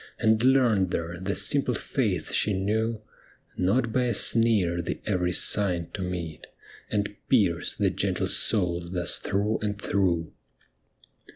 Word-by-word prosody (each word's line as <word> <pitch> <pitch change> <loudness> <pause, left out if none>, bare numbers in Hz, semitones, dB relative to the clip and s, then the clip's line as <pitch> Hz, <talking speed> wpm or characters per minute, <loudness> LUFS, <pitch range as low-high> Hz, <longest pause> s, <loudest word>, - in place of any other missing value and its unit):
And 110 0 +2
learned 120 -8 +3
there 85 0 -4
the 95 +2 -3
simple 140 -4 +1
faith 105 - -2
she 105 - +2
knew, 110 +3 -1 0.5
Not 110 +5 0
by 125 -1 +2
a 120 -3 0
sneer 100 -7 +2
the - - -4
every 90 -3 0
sign 90 -2 +1
to 100 - -5
meet, 90 -4 -5 0.4
And 105 -1 -2
pierce 95 -10 +2
the - - +1
gentle - - -1
soul 90 -5 +1
thus 90 -1 -1
through 105 +3 -1
and 105 -1 -3
through 85 -6 0
100 Hz, 135 wpm, -26 LUFS, 90-110 Hz, 0.5 s, learned